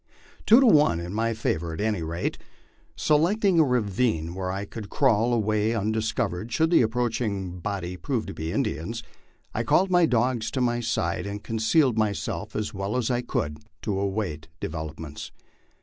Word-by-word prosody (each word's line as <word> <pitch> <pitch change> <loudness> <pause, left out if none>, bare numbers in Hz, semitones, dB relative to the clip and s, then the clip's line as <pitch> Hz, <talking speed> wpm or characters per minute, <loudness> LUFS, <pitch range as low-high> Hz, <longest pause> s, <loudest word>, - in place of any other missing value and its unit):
Two 225 +4 +8
to 270 - +5
one 150 - +5
in 85 +2 -5
my 115 +2 0
favor 85 -6 -1
at - - -8
any 105 -3 0
rate. 85 +2 -3 0.6
Select 170 +8 +2
ing 185 -4 +4
a - - +7
ravine 105 - 0
where 95 0 -3
I 100 +2 -3
could 105 -1 -8
crawl 120 -4 +3
away 110 -1 +1
undiscovered 110 -1 -1
should 160 +7 +2
the 170 - +6
approaching 110 -6 -1
body 90 -1 -4
prove 125 +1 -2
to 100 - -6
be 80 +1 -4
Indians, 110 +10 -2 0.5
I - - 0
called 190 +1 +3
my 175 -2 +5
dogs 120 -2 +1
to - - +2
my 120 -1 +1
side 100 -6 -1
and 100 +1 -5
concealed 115 +2 +2
myself 105 -2 -2
as 105 -1 -2
well 100 +4 -2
as 125 0 0
I 120 0 +1
could 75 -10 -2 0.2
to 100 -2 -1
await 95 -6 -2
developments. 80 -1 -6
110 Hz, 170 wpm, -26 LUFS, 95-125 Hz, 0.6 s, Two